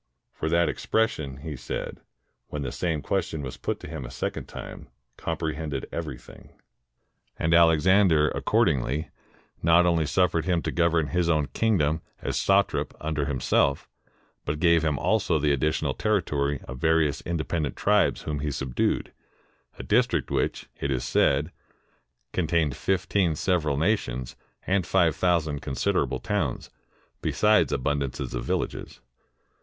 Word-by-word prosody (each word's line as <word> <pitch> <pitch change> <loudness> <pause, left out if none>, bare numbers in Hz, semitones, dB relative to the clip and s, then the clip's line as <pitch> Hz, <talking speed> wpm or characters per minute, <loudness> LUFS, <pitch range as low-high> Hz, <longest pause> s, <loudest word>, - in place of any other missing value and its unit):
For 80 - -3
that 85 +1 +3
expression, 110 - -1
he 80 -2 -5
said, - - -5 0.5
when 75 -1 -4
the 65 - -3
same 80 -5 -2
question 85 -6 -2
was 65 -2 -5
put - - -3
to - - -8
him 65 - -6
a - - -7
second 65 - -4
time, - - -9 0.3
comprehended 75 -2 -3
everything. 75 -7 -7 0.9
And 80 +1 +1
Alexander, 85 0 +5
accordingly, 70 +5 0 0.5
not 85 +2 +5
only 85 -3 +2
suffered 85 -2 +1
him 90 -3 +1
to - - -2
govern 85 -3 +2
his 90 -1 +1
own 75 -4 +1
kingdom 80 -8 +1 0.2
as - - -3
satrap 95 0 +1
under 75 -2 -2
himself, 70 0 +1 0.6
but 75 - -2
gave 85 -1 +4
him 75 -2 0
also 90 0 +1
the 75 -1 +1
additional 75 +3 0
territory 75 -10 0
of 65 0 -7
various 80 -2 +2
independent 80 -2 -2
tribes 105 -1 +2
whom 75 -1 -3
he 75 +1 -2
subdued, 65 -3 -1 0.6
a - - -7
district - - +1
which, - - -1
it 70 - -2
is 65 -3 -1
said, 70 +5 +2 0.8
con 90 -3 0
tained 80 -4 +1
fifteen 95 0 0
several 80 -4 0
nations, 70 - -1 0.3
and 95 -2 +1
five 85 -5 +3
thousand 80 -5 +1
consid 65 -3 -1
erable - - -1
towns, - - -2 0.5
besides 105 -9 +3
abundance 70 -1 -1
of - - -4
villages. - - -3
80 Hz, 140 wpm, -26 LUFS, 70-85 Hz, 0.9 s, Alexander